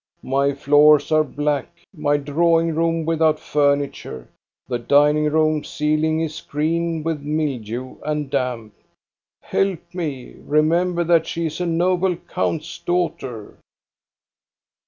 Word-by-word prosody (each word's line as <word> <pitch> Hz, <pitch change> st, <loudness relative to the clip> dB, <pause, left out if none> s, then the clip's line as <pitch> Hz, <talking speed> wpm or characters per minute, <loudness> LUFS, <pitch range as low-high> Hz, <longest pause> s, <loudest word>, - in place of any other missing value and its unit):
My 140 Hz, +2 st, +1 dB
floors 145 Hz, +2 st, +4 dB
are 155 Hz, 0 st, +4 dB
black, 145 Hz, -1 st, -2 dB, 0.3 s
my 145 Hz, -2 st, +1 dB
drawing 165 Hz, +3 st, +1 dB
room 165 Hz, 0 st, 0 dB
without 160 Hz, -1 st, +2 dB
furniture, 140 Hz, -, -1 dB, 0.4 s
the 120 Hz, -2 st, -2 dB
dining 145 Hz, +5 st, +3 dB
room 155 Hz, 0 st, +1 dB
ceiling 155 Hz, +1 st, 0 dB
is 155 Hz, -1 st, -4 dB
green 165 Hz, +2 st, -1 dB
with 160 Hz, -2 st, -2 dB
mildew 130 Hz, -5 st, -3 dB
and 150 Hz, -1 st, -2 dB
damp. 125 Hz, -5 st, -3 dB, 0.7 s
Help 180 Hz, -3 st, -2 dB
me! 150 Hz, -8 st, -5 dB
Remember 170 Hz, +4 st, +1 dB
that 165 Hz, -1 st, +3 dB
she 170 Hz, 0 st, -3 dB
is 160 Hz, +2 st, -4 dB
a 180 Hz, -, -1 dB
noble 180 Hz, +2 st, +1 dB
count's 160 Hz, -1 st, -4 dB
daughter 150 Hz, -, -3 dB
155 Hz, 115 wpm, -21 LUFS, 145-165 Hz, 0.7 s, floors